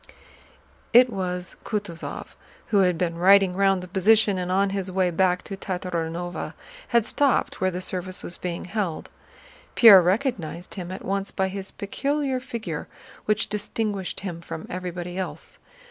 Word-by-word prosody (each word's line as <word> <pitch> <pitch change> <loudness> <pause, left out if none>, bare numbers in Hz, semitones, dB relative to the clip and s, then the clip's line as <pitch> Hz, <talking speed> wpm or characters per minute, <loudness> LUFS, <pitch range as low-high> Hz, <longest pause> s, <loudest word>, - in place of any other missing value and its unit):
It 245 +1 +7
was 180 -2 -4
Kutúzov, 205 -6 -5 0.4
who 205 - +3
had 180 -3 +3
been 170 -1 -1
riding 195 0 +6
round 195 -1 +2
the - - -8
position 205 +1 +3
and 180 0 -3
on 195 +1 +2
his 195 -1 -3
way 185 -1 +1
back 180 +1 +2
to 195 - -6
Tatárinova 175 -2 -4 0.3
had 235 -3 +3
stopped 280 0 +1
where 185 - +3
the 180 0 -4
service 185 0 -3
was 175 - -6
being 175 -1 -4
held. 185 -4 -3 0.6
Pierre 210 -6 +10
recognized 180 - -1
him 180 -2 -6
at 185 - -7
once 195 0 -1
by 190 -1 -1
his 195 0 -6
peculiar 275 +6 -2
figure, 235 -3 -5 0.4
which 210 0 +1
distinguished 210 -2 -3
him 175 -4 -5
from 165 -1 -7
everybody 180 0 -5
else. 185 - -6
190 Hz, 150 wpm, -25 LUFS, 180-205 Hz, 0.6 s, Pierre